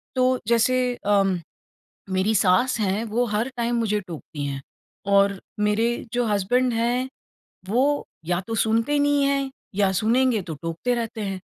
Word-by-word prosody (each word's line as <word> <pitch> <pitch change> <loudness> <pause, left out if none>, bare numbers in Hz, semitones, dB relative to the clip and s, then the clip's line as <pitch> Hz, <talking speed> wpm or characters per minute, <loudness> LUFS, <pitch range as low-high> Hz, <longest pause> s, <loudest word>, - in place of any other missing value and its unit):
तो, 255 0 +2
जैसे 250 +2 +2
अम, 195 -3 +2 0.7
मेरी 190 +3 +1
सास 225 +6 +3
हैं, 205 +2 0
वो 230 +3 0
हर 215 +4 -1
टाइम 235 0 0
मुझे 215 -3 +1
टोकती 155 -3 -6
हैं, 135 -1 -4 0.4
और 200 0 +3 0.2
मेरे 225 +3 +1
जो 245 0 +1
हसबैंड 230 +4 +1
हैं, 240 +3 0 0.6
वो 275 +6 +2 0.2
या 175 0 0
तो 225 - -3
सुनते 225 +5 +1
ही 290 - +3
नहीं 285 -1 +3
हैं 275 -1 0 0.2
या 200 -1 +2
सुनेंगे 230 +3 +2
तो 165 -2 -6
टोकते 165 +9 -1
रहते 230 -2 -4
हैं। 195 -2 -3
225 Hz, 155 wpm, -24 LUFS, 200-245 Hz, 0.7 s, सास